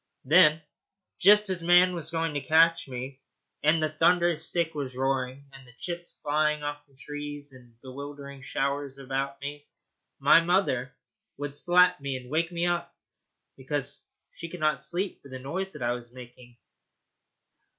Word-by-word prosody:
Then, 155 +1 +6 0.6
just 210 +2 +6
as 180 -2 -2
man 180 +2 +5
was 170 -3 -5
going 165 -2 -1
to 145 - -2
catch 165 +1 +4
me, 130 +1 -7 0.4
and 155 +1 +3
the 155 - +1
thunder 170 +2 +3
stick 165 0 -1
was 135 -4 -5
roaring, 135 0 -1
and 135 -1 -14
the 120 - -17
chips 175 +2 -6
flying 150 0 +1
off 145 0 -4
the 140 - -27
trees 145 0 -7
in 120 -3 -17
bewildering 140 +1 -9
showers 140 0 -2
about 135 +1 -3
me, 145 +1 -7 0.5
my 145 +4 +6
mother 165 -8 +1 0.4
would 145 0 -5
slap 180 +3 +4
me, 140 -1 -3
and 125 0 -12
wake 165 +2 0
me 170 0 -1
up 175 0 -1 0.6
because 140 +1 -4 0.3
she 170 - -8
could 180 - -8
not 155 -3 +1
sleep 180 +6 -3
for 140 - -14
the 130 - -7
noise 180 +9 -4
that 150 - -7
I 120 - +1
was 120 -1 -6
making. 120 -1 -13
145 Hz, 160 wpm, -27 LUFS, 135-165 Hz, 0.6 s, Then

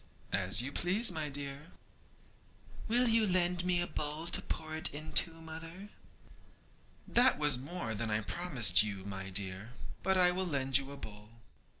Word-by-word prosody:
'As 100 +4 +1
you 135 - -6
please, 190 +8 +2
my 155 -3 -4
dear.' 140 +3 -9 1.2
'Will 245 +2 +4
you 225 -1 +4
lend 180 -1 +1
me 180 -1 0
a 175 - 0
bowl 150 0 -2
to 170 - -2
pour 155 0 -6
it 160 - +4
into, 155 +3 +2
mother?' 165 +5 -10 1.2
'That 245 +2 +3
was 150 -4 +3
more 140 -4 -5
than 110 +1 -3
I 110 0 -1
promised 135 - +4
you, 100 -3 -5
my 95 -1 -7
dear, 95 +3 -3 0.3
but 190 0 0
I 180 -1 +4
will 185 +1 -3
lend 135 -3 +1
you 135 0 -9
a 140 - -9
bowl.' 105 -4 -11
150 Hz, 165 wpm, -31 LUFS, 115-180 Hz, 1.2 s, Will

